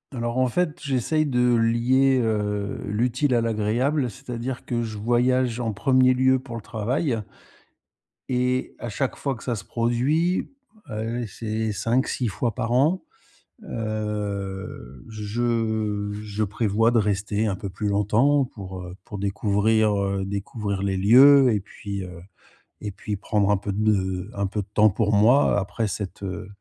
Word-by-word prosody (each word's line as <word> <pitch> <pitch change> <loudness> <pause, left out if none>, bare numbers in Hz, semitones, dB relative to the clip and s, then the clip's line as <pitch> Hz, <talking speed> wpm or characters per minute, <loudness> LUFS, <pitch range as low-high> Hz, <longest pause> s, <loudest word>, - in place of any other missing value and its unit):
Alors 120 +1 -2
en 130 - +3
fait, 160 +4 -1
j'essaye 140 +3 0
de 125 -3 +2
lier, 125 +4 +3
heu, 105 -2 -1
l'utile 125 +5 +1
à 120 - +3
l'agréable, 115 +5 0
c'est-à-dire 125 0 -6
que 120 -1 -2
je 110 -2 -4
voyage 120 +2 +1
en 115 -3 -1
1er 130 +3 +4
lieu 130 +1 +3
pour 125 -2 -9
le 115 - -5
travail 115 +3 -1 1.1
et 125 0 0
à 120 - -5
chaque 130 +5 -2
fois 140 -2 -2
que - - -12
ça 120 - -1
se 100 - -7
produit, 130 - 0 0.4
allez, 115 +2 -3
c'est 110 +1 -3
5-6 120 +4 0
fois 110 +3 -2
par 120 -2 -2
an, 150 +9 +3 0.6
heu, 100 - -4
je 110 -1 -1
je 105 0 -3
prévois 105 +2 +1
de 120 - +2
rester 105 +1 0
un 100 - -1
peu 100 +1 -6
plus 105 +3 -4
longtemps 115 +8 +3
pour, 95 -5 -8
heu, 90 +1 -8
pour 105 - -7
découvrir, 105 +2 +2
heu, 100 -1 -1
découvrir 100 0 -3
les 95 -1 0
lieux 130 +6 +7
et 105 - +1
puis, 100 0 -6
heu 90 -2 -9 0.6
et 105 - -4
puis 105 +2 -5
prendre 100 +1 0
un 100 - +3
peu 100 +1 -4
de 95 -3 0
un 100 0 -1
peu 105 +2 -2
de 100 - -10
temps 110 0 +5
pour 105 +2 0
moi, 115 +5 +5
après 105 +3 -2
cette, 100 -1 -5
heu, 90 -2 -5
110 Hz, 160 wpm, -24 LUFS, 100-125 Hz, 1.1 s, lieux